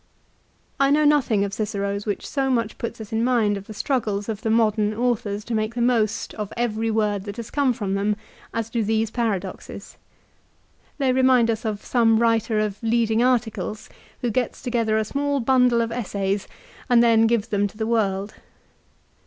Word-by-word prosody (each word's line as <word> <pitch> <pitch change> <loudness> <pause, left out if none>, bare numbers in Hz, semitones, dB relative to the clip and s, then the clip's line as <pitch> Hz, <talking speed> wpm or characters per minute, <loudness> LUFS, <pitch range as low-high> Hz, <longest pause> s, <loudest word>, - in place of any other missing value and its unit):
I 275 0 +4
know 300 +2 +3
nothing 270 -9 +3
of 200 - -6
Cicero's 200 -1 -3
which 205 - -3
so 270 -2 -1
much 230 -4 -1
puts 235 0 -5
us 220 0 -8
in 225 +1 +1
mind 235 -5 +2
of 200 0 -8
the 215 - -8
struggles 210 -5 -1
of 215 -1 -4
the 225 - -2
modern 215 -1 +2
authors 225 -3 -1
to 240 - -4
make 215 +1 -1
the 240 - -1
most 225 -3 +1
of 210 -2 -5
every 225 -1 -1
word 210 -3 0
that 205 -1 -6
has 235 -1 -7
come 280 -3 +2
from 205 -5 -3
them, 205 +1 +1 0.4
as 230 0 -3
do 230 -1 0
these 220 +1 0
paradoxes. 200 -6 -4 1.0
They 270 -3 +2
remind 255 -3 +4
us 225 +2 -4
of 210 -2 -3
some 225 -2 +3
writer 225 -1 +2
of 210 -1 -2
leading 225 -1 +1
articles 235 -3 -1 0.3
who 240 - 0
gets 245 +2 -2
together 230 -3 0
a 220 - 0
small 280 +4 -1
bundle 250 -1 +3
of 230 0 -2
essays 200 -4 -2 0.4
and 240 -1 +6
then 225 -1 +5
gives 225 -2 0
them 205 0 +1
to 205 - -15
the 220 - -1
world. 205 -3 0
225 Hz, 185 wpm, -23 LUFS, 210-240 Hz, 1.0 s, and